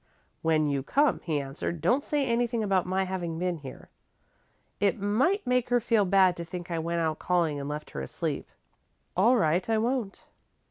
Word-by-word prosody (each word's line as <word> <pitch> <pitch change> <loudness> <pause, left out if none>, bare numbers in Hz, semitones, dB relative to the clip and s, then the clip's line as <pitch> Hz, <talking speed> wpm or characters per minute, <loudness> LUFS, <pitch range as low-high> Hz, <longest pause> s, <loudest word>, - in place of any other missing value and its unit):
"When 160 -1 +2
you 140 -1 0
come," 280 - +2
he 155 -4 0
answered, 140 +4 -4
"don't 260 - +2
say 290 -2 0
anything 235 -1 0
about 190 -3 +1
my 190 +1 +1
having 180 -3 -3
been 180 0 -1
here. 135 -4 -11 0.9
It 205 +2 +1
might 255 - +1
make 250 -1 +1
her 245 0 +4
feel 225 -3 +2
bad 190 -1 +4
to 170 - -4
think 175 0 -7
I 165 - -1
went 170 +1 -1
out 160 -1 -1
calling 170 -5 +1
and 140 +1 -5
left 150 +1 -6
her 70 - -5
asleep." 65 - -4 0.7
"All 225 +8 +5
right 175 +1 +1
I 225 - +3
won't." 230 -3 -2
185 Hz, 185 wpm, -28 LUFS, 165-230 Hz, 0.9 s, All